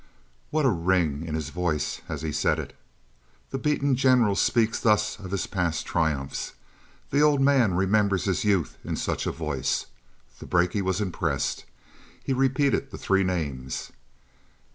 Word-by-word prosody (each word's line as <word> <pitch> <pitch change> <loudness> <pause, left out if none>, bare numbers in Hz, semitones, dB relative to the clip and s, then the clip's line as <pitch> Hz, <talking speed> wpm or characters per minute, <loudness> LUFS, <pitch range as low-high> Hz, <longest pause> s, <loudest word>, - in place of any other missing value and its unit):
What 155 -1 +1
a - - +5
ring 85 -4 0
in 80 - -3
his 80 -2 -3
voice 85 -4 -1
as 80 -2 -4
he 80 - -2
said - - +1
it! - - -6 0.8
The 135 - -2
beaten 140 -2 +1
general 125 -5 +4
speaks 115 +2 +2
thus 105 -1 +2
of 95 -2 -8
his 100 -1 -1
past 85 -4 -1
triumphs. 75 -5 -1 0.6
The 140 - +3
old 150 -2 +4
man 135 -9 +4
remembered 100 0 +2
his 95 -3 0
youth 100 -6 +1
in - - -3
such - - -2
a - - +1
voice. 75 -4 -2 0.5
The - - -9
brakie 90 +3 +2
was 95 +1 0
impressed; 95 -4 -2 0.6
he 135 - -1
repeated 135 +1 +1
the - - -8
three 95 0 +2
names. 70 -9 -3
95 Hz, 155 wpm, -26 LUFS, 85-125 Hz, 0.8 s, a